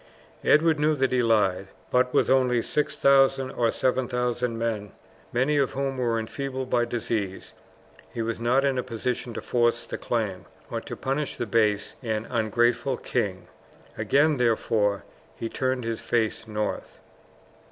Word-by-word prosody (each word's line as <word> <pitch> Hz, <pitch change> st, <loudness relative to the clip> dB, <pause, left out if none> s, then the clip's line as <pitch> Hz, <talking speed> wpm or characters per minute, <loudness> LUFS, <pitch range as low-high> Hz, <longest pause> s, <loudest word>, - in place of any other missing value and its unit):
Edward 155 Hz, 0 st, +4 dB
knew 155 Hz, +1 st, +3 dB
that 135 Hz, -2 st, +1 dB
he 125 Hz, -1 st, +3 dB
lied, 105 Hz, -5 st, +2 dB, 0.2 s
but 125 Hz, 0 st, +3 dB
with -, -, +3 dB
only 125 Hz, -3 st, +3 dB
6000 135 Hz, -2 st, +3 dB
or 115 Hz, -3 st, +1 dB
7000 125 Hz, -2 st, 0 dB
men, 110 Hz, -3 st, -3 dB, 0.4 s
many 135 Hz, +5 st, +1 dB
of 135 Hz, -, +1 dB
whom 135 Hz, -1 st, -2 dB
were 120 Hz, -2 st, +1 dB
enfeebled 130 Hz, +3 st, -4 dB
by 120 Hz, -1 st, +3 dB
disease, 110 Hz, -5 st, -3 dB, 0.6 s
he 115 Hz, -, -3 dB
was 115 Hz, 0 st, -3 dB
not 125 Hz, +4 st, +2 dB
in 135 Hz, -2 st, +1 dB
a -, -, -1 dB
position 125 Hz, 0 st, -3 dB
to -, -, -4 dB
force 120 Hz, -1 st, +1 dB
the -, -, -6 dB
claim, 100 Hz, -5 st, -2 dB, 0.3 s
or 115 Hz, -, -2 dB
to -, -, -7 dB
punish 140 Hz, +2 st, -2 dB
the -, -, -3 dB
base 105 Hz, -2 st, +1 dB
and 110 Hz, -3 st, -2 dB
ungrateful 120 Hz, +1 st, +1 dB
king. -, -, -2 dB, 0.5 s
Again, 140 Hz, +8 st, +3 dB
therefore, 110 Hz, -4 st, +1 dB, 0.3 s
he 115 Hz, -, -4 dB
turned 130 Hz, 0 st, -1 dB
his 115 Hz, 0 st, -3 dB
face 110 Hz, -1 st, -1 dB
north. 105 Hz, -1 st, -3 dB
120 Hz, 150 wpm, -26 LUFS, 115-130 Hz, 0.6 s, Edward